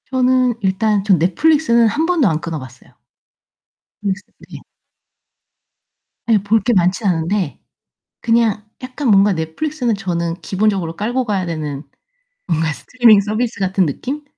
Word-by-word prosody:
저는 255 -1 +2
일단 200 +1 +1
전 195 -3 +3
넷플릭스는 235 - +3
1 300 +9 0
번도 330 -8 +2
안 160 -2 0
끊어 165 -2 -4
봤어요. 130 -1 -14 1.1
넷플릭스 200 0 -2 0.3
네. - - -10 1.7
예. 225 - +5
볼 215 +2 +2
게 245 - +1
많진 190 +3 +1
않은데 175 -1 -1 0.6
그냥 230 -3 +1 0.2
약간 255 +2 -4
뭔가 200 -1 +5
넷플릭스는 235 - -2
저는 170 -4 -2
기본적으로 190 -5 -1
깔고 245 +5 -1
가야 200 -5 -2
되는 150 -4 -4 0.6
뭔가 160 -3 0
스트리밍 220 - +4
서비스 215 +2 -3
같은 190 -1 +1
느낌? 270 - -5
205 Hz, 285 characters per minute, -18 LUFS, 175-240 Hz, 1.7 s, 예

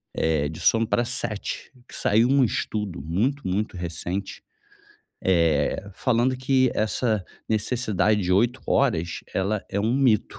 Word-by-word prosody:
eh, 80 -3 +1
de 80 - -8
sono 115 0 +3
pra 120 - +1
7. 120 -2 -4
Que - - -17
saiu 115 +4 +2
um 135 -1 +4
estudo 105 - -3
muito, 110 - -1
muito 100 +3 -1
recente, 90 +3 -4 0.9
eh, 85 +1 +2
falando 125 +2 +1
que 130 -1 +2
essa 110 -1 0 0.2
necessidade 110 -1 +1
de 90 -2 -2
8 120 +7 +2
horas 85 -12 +1
ela 100 +2 -1
é 100 - -1
um 110 +4 +1
mito 125 -6 +2
105 Hz, 140 wpm, -24 LUFS, 90-120 Hz, 0.9 s, um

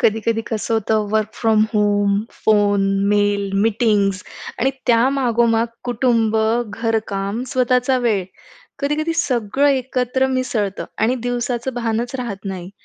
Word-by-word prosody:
कधी-कधी 225 -1 +1
कसं 225 0 -1
होतं, 215 -1 0
work 215 0 0
from 220 -2 +2
home, 205 -1 +2 0.3
phone, 205 -2 +3 0.3
mail, 205 -1 +1
meetings 205 -4 +1 0.4
आणि 265 +3 +3 0.2
त्या 235 0 +4
मागोमाग 235 -2 +2 0.2
कुटुंब, 235 -3 +1 0.3
घरकाम, 220 -1 -2
स्वतःचा 255 +1 +2
वेळ. 205 -5 +1 0.5
कधी-कधी 300 +3 -1
सगळं 260 -2 +1
एकत्र 260 -1 0
मिसळतं 250 -7 -2 0.2
आणि 225 +4 +2
दिवसाचं 245 +1 -2
भानच 235 +1 -2
राहत 220 -6 -5
नाही. 180 -1 -7
225 Hz, 115 wpm, -20 LUFS, 205-250 Hz, 0.5 s, त्या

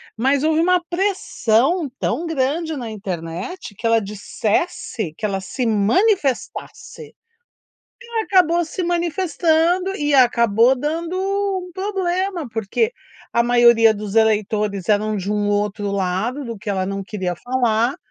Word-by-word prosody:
Mas 270 +5 +1
houve 315 0 +2
uma 360 +1 +3
pressão 345 - +1
tão 335 +1 -1
grande 315 +2 -1
na 235 -3 -5
internet, 190 - -6
que 230 +4 -2
ela 230 0 +4
dissesse, 210 - -2
que 220 - -3
ela 195 -2 -1
se 250 +6 -3
manifestasse. 280 - 0
E 460 0 -28 0.8
ela 450 -1 -1
acabou 345 -2 +3
se 350 +3 -4
manifestando 345 +1 +1
e 295 -1 0
acabou 235 -1 +4
dando 330 +5 -3
um 390 -2 -2
problema. 375 - -2
Porque 225 - -1 0.4
a 235 - +3
maioria 235 -2 +5
dos 210 0 -6
eleitores 210 -3 +1
eram 215 +1 +2
de 200 +1 -2
um 205 -1 0
outro 205 0 -1
lado, 200 +8 -2
do 230 -2 -6
que 210 +2 -9
ela 190 -1 -1
não 195 0 -3
queria 185 -3 -3
falar, 245 0 0
245 Hz, 135 wpm, -20 LUFS, 210-345 Hz, 0.8 s, maioria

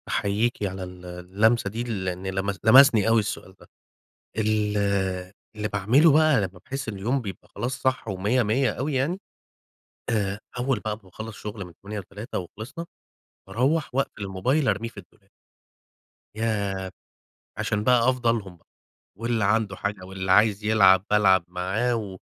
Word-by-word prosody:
أحييكِ 105 +3 0
على 95 -1 -3
ال 90 0 -10
اللمسة 100 +6 +1
دي، 115 +4 -4
لأن 95 -5 -3
لمس 95 +1 -2
لمسني 115 -2 +7
أوي 115 0 +5
السؤال 100 -2 -4
ده. - - -17 0.7
ال 105 -1 +1 0.8
اللي 105 0 -2
باعمله 115 - +4
بقي 155 -1 +5
لمّا 95 -2 -5
باحس 135 -3 -4
إن - - -4
اليوم 120 +8 -1
بيبقي 100 -5 -8
خلاص 125 +3 -4
صح 130 -2 0
و100 105 +6 +1
100 120 +5 +2
أوي 145 +3 -3
يعني. 145 +8 0 0.9
آآ 100 -2 -1 0.2
أول 125 -2 0
بقي 105 -1 -3
ما 110 - -22
باخلص 110 +4 -9
شغل 105 -2 -6
من 90 - -12
08:00 105 +2 -6
ل - - -9
15:00 105 +6 -6
وخلصنا، 115 - -7 0.6
باروَّح 130 +8 0
وأقفل 135 -5 -1
الموبايل 125 +10 0
أرميه 115 +2 0
في 115 - -19
الدولاب. 100 +2 -27 1.1
ياه! 100 -4 -2 0.7
عشان 105 -1 -1
بقي 125 0 +4
أفضى 125 -2 +1
لهم 100 -6 -4
بقى، - - -34 0.5
واللي 115 -1 0
عنده 105 -1 +1
حاجة، 100 -1 -4
واللي 95 0 -2
عايز 105 +1 +4
يلعب 95 -4 +5
بالعب 95 -4 +4
معاه 95 +7 -1
و 100 -4 -5
105 Hz, 155 wpm, -25 LUFS, 95-120 Hz, 1.1 s, لمسني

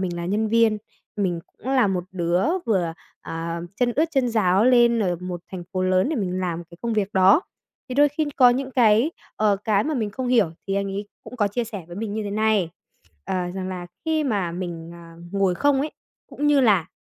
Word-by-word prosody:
mình 180 -2 -2
là 170 0 -4
nhân 215 +4 0
viên, 225 -1 +3 0.4
mình 180 -5 -1
cũng 260 - -11
là 255 -5 +4
một 185 -2 -1
đứa 175 0 +1 0.2
vừa, 180 -7 +1 0.3
ờ, 165 +1 -5 0.3
chân 240 0 +1
ướt 310 - +4
chân 270 -5 +1
ráo 205 -3 +3
lên 240 -2 +5
ở 180 -4 0
một 180 -1 -5
thành 180 -2 -6
phố 185 - -1
lớn 185 +4 +2
để 315 - -1
mình 185 -4 -2
làm 175 -2 -3
cái 170 +1 -16
công 235 -1 -1
việc 210 -1 -1
đó. 190 - +5 0.5
Thì 255 - -4
đôi 290 +2 +5
khi 300 +2 -1
có 250 -2 +7
những 260 +2 -2
cái, 235 +2 +4 0.3
ờ, 210 -2 +3
cái 210 -2 +2
mà 310 - -1
mình 220 -6 -1
không 255 +4 -4
hiểu 230 -9 +3 0.2
thì 195 - -1
anh 200 0 0
ấy 200 +1 -4 0.2
cũng 250 - -10
có 205 -3 +2
chia 235 +4 -2
sẻ 210 -6 -7
với 175 - -9
mình 210 0 -4
như 220 - -2
thế 200 - -4
này, 215 -4 +1 0.5
ờ, - - -3 0.2
rằng 190 -1 -4
là 180 -1 -5 0.2
khi 315 -2 +1
mà 200 -9 -1
mình, 170 -2 -5
à, 170 -1 -13 0.2
ngồi 195 -2 +2
không 280 +6 +2
ấy, 305 - -2 0.4
cũng 295 - -2
như 295 -1 +5
là 200 -9 +3
205 Hz, 230 wpm, -23 LUFS, 180-240 Hz, 0.5 s, có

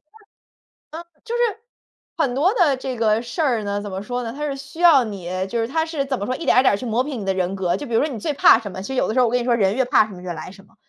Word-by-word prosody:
是 - - -63 2.2
很 260 -6 +1
多 360 +9 +2
的 335 - +3
这 260 -1 -5
个 220 -1 +2
事 245 +8 -4
儿 240 -8 +1
呢， 200 0 -2
怎 205 - -6
么 190 0 -4
说 245 +3 -4
呢？ 230 -1 -5
它 290 - -8
是 275 -1 -3
需 280 +3 -12
要 330 -7 +7
你 200 -5 -7 0.2
就 235 +2 -2
是 225 - 0
它 320 +3 0
是 320 -4 -3
怎 270 -1 -2
么 200 - -3
说， 255 - -2
一 335 - -7
点 - - +3
儿 - - +8
一 - - +2
点 255 - +4
儿 - - +1
去 250 - -7
磨 230 +2 +1
平 270 -6 -5
你 195 - -6
的 190 - +1
人 185 0 -1
格。 180 -2 0
就 290 - -6
比 235 - -8
如 - - +4
说 310 - -1
你 - - -5
最 295 +8 -2
怕 245 - +6
什 205 -3 -7
么， 185 - -7
其 195 - -7
实 265 - -4
有 - - +1
的 220 - -2
时 255 - 0
候 245 - +4
我 - - -1
跟 250 - +3
你 240 - -3
说 245 - +2
人 200 -3 +2
越 260 0 +1
怕 250 -4 +3
什 210 - -12
么 180 -1 -11
越 180 -1 -4
来 160 - -8
什 195 0 -16
么。 - - -27
240 Hz, 365 characters per minute, -21 LUFS, 205-275 Hz, 2.2 s, 儿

